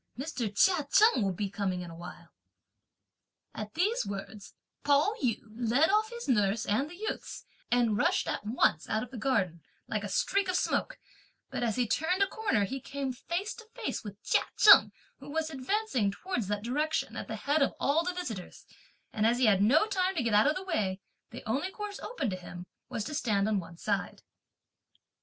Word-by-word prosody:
Mr. 260 Hz, -6 st, -3 dB
Chia 300 Hz, -, +3 dB
Cheng 430 Hz, -, +5 dB
will 195 Hz, -, +1 dB
be 200 Hz, +3 st, -2 dB
coming 190 Hz, -2 st, -2 dB
in 175 Hz, -1 st, -7 dB
a -, -, -10 dB
while." 175 Hz, +1 st, -10 dB, 1.2 s
At 210 Hz, 0 st, -7 dB
these 395 Hz, -, +1 dB
words, 200 Hz, 0 st, -7 dB, 0.3 s
Pao 290 Hz, +8 st, +3 dB
yü 240 Hz, -5 st, 0 dB
led 245 Hz, -, +3 dB
off 430 Hz, +1 st, +2 dB
his 475 Hz, 0 st, -7 dB
nurse 215 Hz, -3 st, +2 dB
and 265 Hz, +9 st, 0 dB
the 350 Hz, -, -10 dB
youths, 430 Hz, +4 st, -5 dB, 0.2 s
and 240 Hz, -3 st, +3 dB
rushed -, -, +1 dB
at -, -, -2 dB
once 210 Hz, -7 st, +1 dB
out 220 Hz, -, 0 dB
of 250 Hz, -, -10 dB
the 250 Hz, -, -7 dB
garden, 200 Hz, -10 st, 0 dB, 0.3 s
like 215 Hz, -2 st, -2 dB
a 205 Hz, -, -4 dB
streak 395 Hz, -, +1 dB
of 365 Hz, -, 0 dB
smoke; -, -, 0 dB, 0.5 s
but -, -, -3 dB
as 230 Hz, -3 st, 0 dB
he 250 Hz, -1 st, +1 dB
turned 360 Hz, -, +1 dB
a -, -, +1 dB
corner, 400 Hz, -, 0 dB
he 265 Hz, +6 st, -5 dB
came 275 Hz, -1 st, -4 dB
face 345 Hz, -, -3 dB
to 455 Hz, -, -12 dB
face 470 Hz, -, -3 dB
with 205 Hz, -2 st, -9 dB
Chia -, -, +3 dB, 0.2 s
Cheng, 425 Hz, -, +8 dB, 0.3 s
who 275 Hz, +1 st, -11 dB
was 320 Hz, +1 st, -2 dB
advancing 275 Hz, -, 0 dB
towards 240 Hz, -, -3 dB
that 205 Hz, 0 st, -2 dB
direction, 300 Hz, +6 st, -1 dB
at -, -, -5 dB
the -, -, -4 dB
head 290 Hz, +2 st, 0 dB
of 275 Hz, -, +2 dB
all 305 Hz, +4 st, +2 dB
the 360 Hz, -, -1 dB
visitors; 230 Hz, -, -6 dB, 0.5 s
and 215 Hz, 0 st, +2 dB
as 235 Hz, +1 st, +2 dB
he 255 Hz, -, +3 dB
had 200 Hz, -3 st, +4 dB
no 275 Hz, -, +5 dB
time 380 Hz, -3 st, 0 dB
to 290 Hz, -, 0 dB
get 230 Hz, -2 st, 0 dB
out 210 Hz, +5 st, +5 dB
of 300 Hz, -, +2 dB
the 375 Hz, -, -4 dB
way, 205 Hz, -, -1 dB, 0.3 s
the -, -, -10 dB
only 275 Hz, +11 st, 0 dB
course 410 Hz, +1 st, -6 dB
open 315 Hz, -, -3 dB
to -, -, -2 dB
him 180 Hz, -1 st, -9 dB, 0.2 s
was 220 Hz, -, -3 dB
to 300 Hz, -, -6 dB
stand 215 Hz, -9 st, +1 dB
on 215 Hz, -2 st, +1 dB
one 170 Hz, -1 st, -10 dB
side. 200 Hz, +2 st, -2 dB
250 Hz, 200 wpm, -30 LUFS, 205-340 Hz, 1.2 s, Cheng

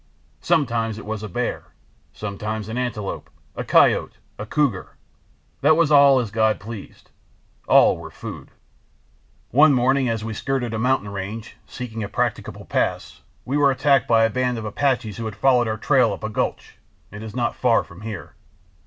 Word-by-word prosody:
Sometimes 115 Hz, -6 st, 0 dB
it 110 Hz, -, -9 dB
was 110 Hz, 0 st, -4 dB
a 105 Hz, -, -6 dB
bear, 120 Hz, +6 st, -3 dB, 0.5 s
sometimes 105 Hz, +1 st, -5 dB
an 110 Hz, -, -4 dB
antelope, 120 Hz, -6 st, -4 dB, 0.3 s
a -, -, -4 dB
coyote, -, -, +3 dB, 0.2 s
a 105 Hz, -, -5 dB
cougar—that 145 Hz, +3 st, -2 dB
was 165 Hz, -3 st, +3 dB
as 135 Hz, -6 st, +5 dB
God 110 Hz, 0 st, +1 dB
pleased; 110 Hz, 0 st, -10 dB, 0.6 s
all -, -, +6 dB
were -, -, -9 dB
food. -, -, -9 dB, 1.0 s
"One 145 Hz, +3 st, +6 dB
morning 130 Hz, +1 st, +2 dB
as 110 Hz, -1 st, -2 dB
we 115 Hz, -, -4 dB
skirted 125 Hz, 0 st, -2 dB
a 115 Hz, -, -2 dB
mountain 125 Hz, -4 st, +1 dB
range, 100 Hz, +3 st, -6 dB
seeking 115 Hz, -3 st, -6 dB
a 100 Hz, -, -5 dB
practicable -, -, -3 dB
pass, -, -, -2 dB, 0.2 s
we 135 Hz, +3 st, -1 dB
were 145 Hz, -1 st, +4 dB
attacked 135 Hz, 0 st, +2 dB
by 115 Hz, -1 st, +4 dB
a 115 Hz, -, +3 dB
band 125 Hz, 0 st, -1 dB
of 110 Hz, -, -5 dB
Apaches 120 Hz, -1 st, -1 dB
who 115 Hz, -, -5 dB
had 110 Hz, -2 st, -5 dB
followed 125 Hz, +2 st, +3 dB
our 110 Hz, 0 st, -2 dB
trail -, -, +3 dB
up -, -, -9 dB
a -, -, -2 dB
gulch—it 105 Hz, +2 st, -6 dB
is 110 Hz, -1 st, -8 dB
not 120 Hz, -2 st, 0 dB
far 120 Hz, -3 st, +2 dB
from 85 Hz, +4 st, -14 dB
here. 110 Hz, -3 st, -7 dB
115 Hz, 165 wpm, -22 LUFS, 110-130 Hz, 1.0 s, all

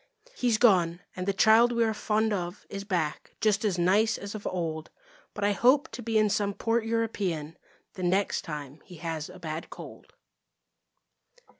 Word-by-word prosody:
He's 240 Hz, -3 st, +1 dB
gone, 180 Hz, -7 st, +3 dB
and 185 Hz, 0 st, -4 dB
the -, -, +3 dB
child 220 Hz, +4 st, +5 dB
we 235 Hz, -1 st, +2 dB
are 220 Hz, -1 st, +1 dB
fond 215 Hz, 0 st, 0 dB
of 175 Hz, 0 st, -4 dB
Is 200 Hz, 0 st, -5 dB
back, 175 Hz, -7 st, -3 dB
just 210 Hz, -1 st, +2 dB
as 200 Hz, -5 st, 0 dB
nice 205 Hz, +6 st, +3 dB
as 200 Hz, 0 st, -7 dB
of 215 Hz, -2 st, -5 dB
old. 160 Hz, -3 st, -3 dB, 0.5 s
But 205 Hz, -, -4 dB
I 205 Hz, -, +3 dB
hope 255 Hz, +7 st, +3 dB
to 250 Hz, -, -7 dB
be 225 Hz, -1 st, 0 dB
in 215 Hz, 0 st, +4 dB
some 205 Hz, -1 st, 0 dB
port 230 Hz, 0 st, 0 dB
European 200 Hz, -9 st, -2 dB, 0.4 s
The 185 Hz, -, -8 dB
next 190 Hz, +3 st, +1 dB
time 150 Hz, -2 st, -7 dB
he 180 Hz, -, -13 dB
has 165 Hz, -2 st, -5 dB
a 185 Hz, -, -11 dB
bad 160 Hz, -1 st, -6 dB
cold. -, -, -11 dB
200 Hz, 175 wpm, -28 LUFS, 175-220 Hz, 0.5 s, child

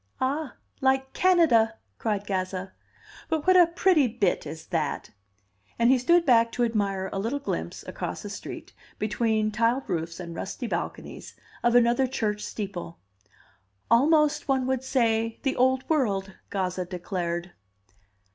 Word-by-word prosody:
"Ah! 280 Hz, +3 st, -2 dB, 0.3 s
like 265 Hz, 0 st, +1 dB
Canada!" 310 Hz, -12 st, +4 dB, 0.2 s
cried 205 Hz, -3 st, -1 dB
Gazza. 190 Hz, -1 st, -3 dB, 0.6 s
"But 315 Hz, -3 st, -1 dB
what 370 Hz, 0 st, +5 dB
a 355 Hz, -2 st, +7 dB
pretty 340 Hz, -4 st, +3 dB
bit 210 Hz, -9 st, 0 dB
is 160 Hz, +2 st, -8 dB
that!" 155 Hz, -5 st, -2 dB, 0.7 s
And 235 Hz, +2 st, +4 dB
he 260 Hz, -, +4 dB
stood 340 Hz, +7 st, +4 dB
back 230 Hz, -3 st, +4 dB
to 245 Hz, -, 0 dB
admire 200 Hz, -4 st, -1 dB
a 195 Hz, -, -2 dB
little 230 Hz, +8 st, -1 dB
glimpse, 285 Hz, -, -4 dB
across -, -, -5 dB
a -, -, -5 dB
street, -, -, -8 dB, 0.2 s
between 215 Hz, 0 st, 0 dB
tiled 230 Hz, +5 st, +1 dB
roofs 170 Hz, -3 st, -3 dB
and 170 Hz, -2 st, -7 dB
rusty 195 Hz, +8 st, -5 dB
balconies, -, -, -5 dB, 0.3 s
of 240 Hz, 0 st, +2 dB
another 245 Hz, +2 st, +4 dB
church 210 Hz, -5 st, -2 dB
steeple. 190 Hz, -6 st, -6 dB, 0.9 s
"Almost, 300 Hz, +5 st, +4 dB
one 265 Hz, -2 st, +1 dB
would 260 Hz, 0 st, -1 dB
say, 230 Hz, -4 st, +1 dB
the 270 Hz, -1 st, 0 dB
Old 260 Hz, +1 st, +2 dB
World," 200 Hz, -11 st, 0 dB, 0.2 s
Gazza 185 Hz, -2 st, -2 dB
declared. 175 Hz, -1 st, -4 dB
230 Hz, 140 wpm, -26 LUFS, 195-265 Hz, 0.9 s, a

